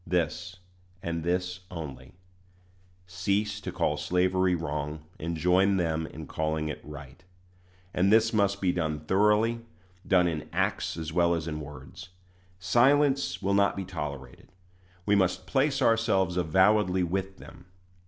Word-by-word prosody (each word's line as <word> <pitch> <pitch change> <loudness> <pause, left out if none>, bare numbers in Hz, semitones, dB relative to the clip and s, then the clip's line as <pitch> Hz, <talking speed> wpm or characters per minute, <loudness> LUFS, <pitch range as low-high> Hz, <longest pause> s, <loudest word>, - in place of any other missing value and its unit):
This, 90 +1 -2 0.5
and 85 -1 -3
this 90 +1 -1
only: 80 -6 -8 0.9
cease 100 +3 -1
to - - -5
call - - 0
slavery 90 0 +1
wrong, 75 -2 -4 0.2
and 85 +1 -3
join 95 +4 +3
them 80 -2 -1
in 80 - -9
calling 80 +1 -2
it 75 - -6
right. 75 +2 -11 0.7
And 95 +3 +2
this 115 +1 +4
must 100 -2 +1
be 90 -2 +2
done 80 -4 -2
thoroughly 105 +7 +2 0.5
done 90 -2 +4
in 80 -3 -4
acts - - -1
as 80 -1 -5
well 85 0 +3
as 85 -1 -4
in 75 -1 -4
words. 75 +5 -10 0.5
Silence 130 +1 +2
will 100 +1 +1
not 100 0 +3
be 95 - -4
tolerated 75 -7 -7 0.5
we 105 - +2
must 95 -3 +1
place 135 0 +1
ourselves 110 -6 +2
avowedly 95 +2 +3
with 95 +2 -3
them. - - -14
90 Hz, 140 wpm, -28 LUFS, 80-100 Hz, 0.9 s, this